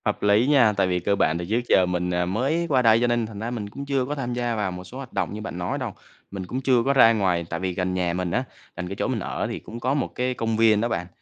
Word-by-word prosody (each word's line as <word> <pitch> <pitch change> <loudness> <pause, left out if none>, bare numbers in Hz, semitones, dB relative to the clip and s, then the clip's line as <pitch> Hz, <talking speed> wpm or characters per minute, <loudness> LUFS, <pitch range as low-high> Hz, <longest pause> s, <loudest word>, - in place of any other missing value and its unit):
Hợp - - -1
lý 105 +4 +4
nha, 130 -7 +5
tại 95 -1 +3
vì 90 -1 0
cơ 100 +3 +1
bản 80 -4 +1
thì 85 - -4
trước 115 +3 +1
giờ 95 - +5
mình, 90 0 -1
ờ, 90 0 +1
mới 135 - 0
qua 130 -3 +3
đây, 115 -2 +5
cho 120 - +3
nên 120 -1 +1
thành 110 -2 -8
ra 115 +2 -3
mình 110 -4 -4
cũng 140 +7 -7
chưa 135 -2 0
có 145 +3 -3
tham 125 -4 -3
gia 120 -1 -1
vào 105 -3 -1
một 90 0 -7
số 120 +8 -11
hoạt 135 -2 -9
động - - -1
như 105 - -6
bạn 105 -5 -6
nói 90 0 -2
đâu. - - -4 0.4
Mình 95 -2 -5
cũng 130 +8 -4
chưa 125 -3 +3
có 140 - +3
ra 115 -4 +7
ngoài, 90 -5 +1
tại 85 - -3
vì 95 -1 -2
gần 90 0 -1
nhà 90 -2 0
mình 90 -1 -2
á, 125 - 0 0.3
gần 90 0 -4
cái 100 - -5
chỗ - - -1
mình - - -1
ở - - -3
thì - - -4
cũng 115 +2 -9
có 130 +3 0
một 140 - 0
cái 125 +1 0
công 115 -2 -2
viên 110 -2 +4
đó 115 - +1
bạn, 90 -4 -2
110 Hz, 320 wpm, -24 LUFS, 90-125 Hz, 0.4 s, ra